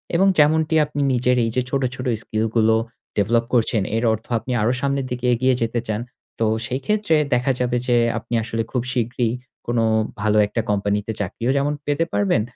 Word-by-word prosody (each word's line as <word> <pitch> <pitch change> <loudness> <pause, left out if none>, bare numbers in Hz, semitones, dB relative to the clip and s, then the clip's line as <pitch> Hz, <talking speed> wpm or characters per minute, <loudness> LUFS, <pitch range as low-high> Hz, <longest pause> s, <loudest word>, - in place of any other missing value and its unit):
এবং 190 +3 +4
যেমনটি 160 +2 +3
আপনি 145 -1 -4
নিজের 125 0 +2
এই - - 0
যে 125 - +2
ছোট, 135 0 0
ছোট 125 - -6 0.2
স্কিল 110 0 -2
গুলো 110 -1 +4 0.4
ডেভেলপ 115 +3 +2
করছেন 115 -3 +2 0.2
এর 115 - -1
অর্থ 110 0 -5
আপনি 125 - -7
আরো 120 +4 +2
সামনের 140 -1 0
দিকে 125 0 -3
এগিয়ে 130 +2 +2
যেতে 115 +1 0
চান 110 0 -2 0.4
তো 115 - +2 0.2
সেই 130 +1 -2
ক্ষেত্রে 210 -5 +2 0.2
দেখা 125 +2 +2
যাবে 125 0 +1
যে 120 -1 +3 0.2
আপনি 115 - -7
আসলে 115 0 -2
খুব 125 - 0
শীঘ্রই 120 -1 0 0.4
কোনো 120 -1 +1 0.4
ভালো 105 0 +2
একটা 115 - -2
কোম্পানিতে 105 +1 0
চাকরিও 115 +5 -2
যেমন 145 +1 +1
পেতে 145 +3 +1
পারবেন 100 +1 +2
120 Hz, 185 wpm, -21 LUFS, 110-135 Hz, 0.4 s, এবং